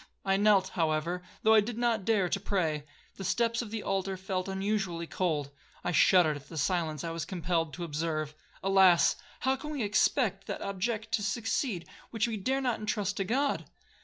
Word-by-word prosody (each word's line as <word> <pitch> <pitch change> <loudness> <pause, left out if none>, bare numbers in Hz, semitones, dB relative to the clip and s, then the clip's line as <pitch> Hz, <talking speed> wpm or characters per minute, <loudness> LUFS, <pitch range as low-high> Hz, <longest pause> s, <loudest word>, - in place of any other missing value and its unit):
I 195 0 +3
knelt, 200 -2 +4
however, 165 +1 0 0.2
though 220 - +6
I 220 - +8
did 225 +2 -5
not 235 -4 +1
dare 205 -4 +3
to 195 - -1
pray. 160 -7 -1 0.3
The 195 - -6
steps 230 +5 +1
of 235 - -6
the 220 0 -4
altar 195 0 -1
felt 185 0 -3
unusually 195 -3 -1
cold,—I 150 -4 -3
shuddered 175 -3 +5
at 140 - -15
the 165 - -8
silence 155 -2 0
I 165 - -3
was 165 -1 -3
compelled 170 -2 -1
to 175 - -5
observe. 155 -1 -2 0.3
Alas! 190 -3 +5 0.3
how 265 0 +2
can 285 +3 -7
we 290 -6 -2
expect 205 0 +1
that - - -4
object 215 +3 -2
to 230 - +1
succeed, 215 - -1 0.2
which 225 -1 0
we 230 - -2
dare 260 +7 0
not 245 -4 0
entrust 205 -2 -2
to 195 - +1
God. 270 +8 0
195 Hz, 185 wpm, -30 LUFS, 170-220 Hz, 0.3 s, I